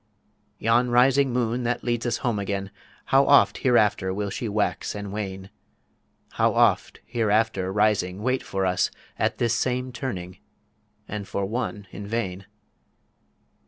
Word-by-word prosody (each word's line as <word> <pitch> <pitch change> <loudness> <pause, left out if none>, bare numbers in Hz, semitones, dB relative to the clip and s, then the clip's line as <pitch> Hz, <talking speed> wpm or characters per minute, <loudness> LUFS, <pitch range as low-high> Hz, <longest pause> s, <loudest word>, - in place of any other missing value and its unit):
Yon 120 +3 +2
rising 130 +2 +4
Moon 120 0 0
that 120 0 -1
leads 120 0 -1
us 120 - 0
Home 115 -4 +1
again, 100 -1 -3 0.3
How 135 +1 +4
oft 100 -8 +5
hereafter 105 -7 +2
will 100 +1 -3
she 120 0 -3
wax 105 0 -1
and 100 -1 -5
wane; 95 -2 -5 0.8
How - - +1
oft - - +2
hereafter 110 -4 +1
rising 105 -2 +1
wait 130 +1 +1
for 95 0 -2
us 90 -1 +1 0.3
At - - 0
this 120 -2 +1
same 125 +2 -1
Turning 95 -8 -5 0.7
and 105 -2 -5
for 100 - -2
One 105 -1 -3
in 100 +1 -8
vain. 100 -4 -3
110 Hz, 140 wpm, -25 LUFS, 100-120 Hz, 0.8 s, oft